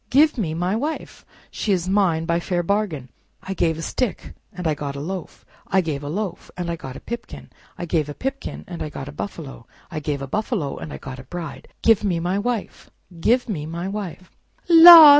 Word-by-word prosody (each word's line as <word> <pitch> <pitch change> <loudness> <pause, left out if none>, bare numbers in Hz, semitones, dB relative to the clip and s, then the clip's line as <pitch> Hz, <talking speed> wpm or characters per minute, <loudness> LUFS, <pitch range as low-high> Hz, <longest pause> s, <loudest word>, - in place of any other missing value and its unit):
Give 300 +4 +5
me 170 - -1
my 180 +4 0
wife! 295 +8 -3 0.3
She 210 - -1
is 180 -2 +1
mine 185 -5 +2
by 170 0 +2
a - - -2
fair 175 0 0
bargain. 170 -9 -1 0.3
I 190 - -3
gave 165 -4 +1
a 165 - -5
stick 235 -2 -2 0.2
and 180 -1 -7
I 155 - +3
got 145 -1 -4
a - - -4
loaf; 180 +5 -6 0.2
I 190 - +3
gave 155 -5 -3
a 145 - -5
loaf 195 +3 -3
and 175 -1 -2
I - - -1
got 135 -5 -8
a - - -7
pipkin; 235 0 -7 0.3
I 175 - -3
gave 155 -3 0
a 145 - -6
pipkin 270 +1 -4
and 175 -2 -6
I 155 - -2
got 135 -2 -7
a - - -6
buffalo; 145 -7 -7 0.2
I 155 - -2
gave 145 -2 -2
a - - -4
buffalo 200 - -1
and 150 - -7
I - - -5
got 130 0 -8
a - - -8
bride. 165 +3 -7 0.2
Give 225 -3 +5
me 180 -5 +1
my 180 +4 0
wife! 235 -1 -3 0.3
Give 245 +8 +3
me 155 -9 -3
my 170 +3 -4
wife!" 195 -3 -5 0.4
"La! 330 -2 +12
175 Hz, 220 wpm, -23 LUFS, 155-210 Hz, 0.4 s, La